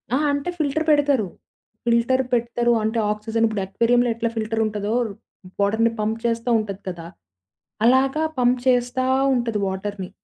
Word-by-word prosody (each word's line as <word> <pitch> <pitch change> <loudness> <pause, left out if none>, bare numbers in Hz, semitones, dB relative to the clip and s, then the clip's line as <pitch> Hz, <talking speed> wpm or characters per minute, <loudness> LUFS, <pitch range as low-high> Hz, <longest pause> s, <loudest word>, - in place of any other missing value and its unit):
ఆహా! 295 +2 +1
అంటే 285 +5 -2
ఫిల్టర్ 310 +1 -1
పెడతారు. 285 -7 +3 0.6
ఫిల్టర్ 235 +3 +2
పెడతారు, 240 0 +1
అంటే 220 +1 0
ఆక్సిజన్ 220 +2 0
ఇప్పుడు 215 -3 -2
అక్వేరియంలో 235 +5 +2
ఎట్లా 230 0 -1
ఫిల్టరుంటదో 215 -1 -1 0.7
బోర్డర్‌ని 220 +3 +2
పంప్ 220 +2 -1
చేస్తా 230 +1 -1
ఉంటది 200 -2 -5
కదా! 170 -2 -7 0.8
అలాగా 270 +5 +3 0.2
పంప్ 245 0 +3
చేస్తా 250 0 +2 0.3
ఉంటది 230 -3 -1
వాటర్‌ని. 190 0 -4
230 Hz, 130 wpm, -22 LUFS, 215-250 Hz, 0.8 s, పెడతారు